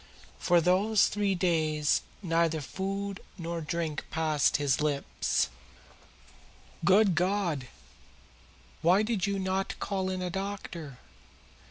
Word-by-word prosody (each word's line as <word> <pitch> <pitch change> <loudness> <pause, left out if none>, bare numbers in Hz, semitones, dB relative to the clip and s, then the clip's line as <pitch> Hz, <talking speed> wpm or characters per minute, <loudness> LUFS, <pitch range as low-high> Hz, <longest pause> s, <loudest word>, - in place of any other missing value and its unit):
For 175 -1 +4
these 195 +5 +4
three 200 -1 0
days 155 -4 +1 0.2
neither 165 -2 +1
food 195 +6 -4 0.2
nor 170 -1 -4
drink 160 -1 -2
has - - -26
passed 155 -2 +2
his 145 0 +1
lips." 145 -2 0 1.3
"Good 195 +2 +5
God! 175 -6 0 1.1
Why 185 +5 +4
did 215 -3 0
you 200 0 0
not 190 0 -2
call 190 -2 -2
in 185 -1 -3
a 180 - -2
doctor?" 190 -7 -5
180 Hz, 115 wpm, -29 LUFS, 160-195 Hz, 1.3 s, Good